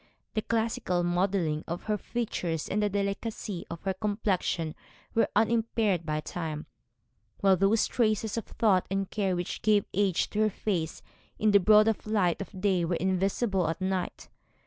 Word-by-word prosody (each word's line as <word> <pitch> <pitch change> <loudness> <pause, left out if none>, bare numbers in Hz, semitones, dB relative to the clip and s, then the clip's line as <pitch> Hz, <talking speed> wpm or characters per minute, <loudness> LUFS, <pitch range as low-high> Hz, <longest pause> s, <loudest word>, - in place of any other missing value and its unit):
The 215 - 0
classical 220 -6 0
modelling 175 -3 0
of 170 +1 -4
her 215 - 0
features 180 -10 -3
and 210 - 0
the 210 - +2
delicacy 200 -1 -3
of 170 - -7
her 195 -1 0
complexion 190 -5 -1 0.4
were 225 - +2
unimpaired 220 -5 +1
by 155 0 -1
time, 155 -2 -5 0.8
while 195 -1 +5
those 195 +4 +3
traces 215 -2 0
of 230 - -3
thought 195 -5 +2
and 195 0 -2
care 195 -4 0
which 175 0 -4
gave 210 -2 +3
age 195 -2 +1
to 210 - -2
her 215 0 +4
face 180 -6 -3 0.3
in 215 0 +3
the 200 - +7
broad 215 +3 +5
light 200 -5 +1
of 195 -1 -8
day 190 -3 +2
were 170 +1 0
invisible 190 +1 +1
at 165 - -3
night. 185 -1 -2
195 Hz, 160 wpm, -29 LUFS, 175-215 Hz, 0.8 s, the